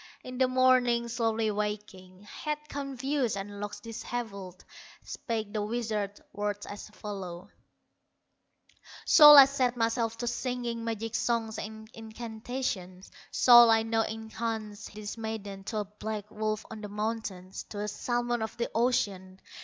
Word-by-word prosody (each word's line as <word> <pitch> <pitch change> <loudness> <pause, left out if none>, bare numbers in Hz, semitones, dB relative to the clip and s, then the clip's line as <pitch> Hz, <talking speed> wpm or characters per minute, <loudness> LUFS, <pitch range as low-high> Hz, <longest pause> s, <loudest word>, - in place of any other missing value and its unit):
In 255 0 -7
the 260 - +4
morning, 255 -2 +3
slowly 225 -2 0
waking, 205 -3 -5
Head 300 +8 -4
confused, 275 -4 -2
and 200 +1 -6
locks 205 0 -6
dishevelled, 215 -5 -6 0.4
Spake 220 -3 -4
the 215 - -1
wizard, 215 -2 -2
words 205 0 -3
as 205 +1 -8
follow: 195 -5 -7 1.5
"Shall 295 -2 +10
I 275 - +12
set 255 -3 0
myself 230 0 0
to 240 - -3
singing 240 -1 -3
Magic 225 0 -3
songs 225 -1 -1
and 220 0 -7
incantations? 220 -4 -5 0.2
Shall 240 -1 +8
I 225 0 +4
now 225 0 +1
enchant 220 -1 -5
this 210 +2 -7
maiden 205 -3 -5
To 220 - -3
a 210 - -1
black 210 +1 -6
wolf 215 0 -2
on 220 -1 -7
the 210 - -6
mountains, 210 -3 -4
To 205 - -8
a 210 - -2
salmon 240 +2 -1
of 220 - -4
the 235 - -2
ocean? 195 -6 0
220 Hz, 140 wpm, -29 LUFS, 205-240 Hz, 1.5 s, I